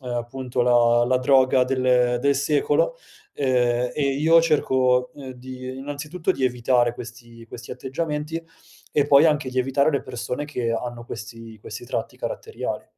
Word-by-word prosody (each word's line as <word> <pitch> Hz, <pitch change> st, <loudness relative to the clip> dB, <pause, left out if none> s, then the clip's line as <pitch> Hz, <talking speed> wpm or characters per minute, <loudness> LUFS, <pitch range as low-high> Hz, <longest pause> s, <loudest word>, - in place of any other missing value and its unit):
uhm, 125 Hz, -, -8 dB
appunto 125 Hz, +1 st, -4 dB
la 120 Hz, -1 st, +4 dB
la 130 Hz, -, +2 dB
droga 130 Hz, -1 st, +4 dB
del 125 Hz, -2 st, +2 dB
del 140 Hz, +1 st, +2 dB
secolo, 145 Hz, -, +1 dB, 0.4 s
ehm, 125 Hz, -2 st, +1 dB
e 150 Hz, -, -1 dB, 0.2 s
io 165 Hz, +2 st, +5 dB
cerco, 130 Hz, -5 st, +2 dB
ehm, 135 Hz, -2 st, -9 dB
di 130 Hz, +1 st, -8 dB
innanzitutto 150 Hz, +6 st, -3 dB
di 135 Hz, -, -2 dB
evitare 120 Hz, -1 st, +2 dB
questi 120 Hz, -1 st, -11 dB
questi 120 Hz, +1 st, -10 dB
atteggiamenti 150 Hz, +3 st, -4 dB, 0.5 s
e 145 Hz, -1 st, +2 dB
poi 145 Hz, +2 st, +6 dB
anche 150 Hz, -3 st, +1 dB
di 130 Hz, 0 st, -3 dB
evitare 135 Hz, +3 st, +2 dB
le 140 Hz, -, -1 dB
persone 125 Hz, +4 st, -5 dB
che 125 Hz, -6 st, -3 dB
hanno 120 Hz, 0 st, -5 dB
questi 115 Hz, -1 st, -9 dB
questi 110 Hz, +3 st, -8 dB
tratti -, -, -4 dB
caratteriali. 455 Hz, -3 st, -5 dB
130 Hz, 155 wpm, -23 LUFS, 120-145 Hz, 0.5 s, poi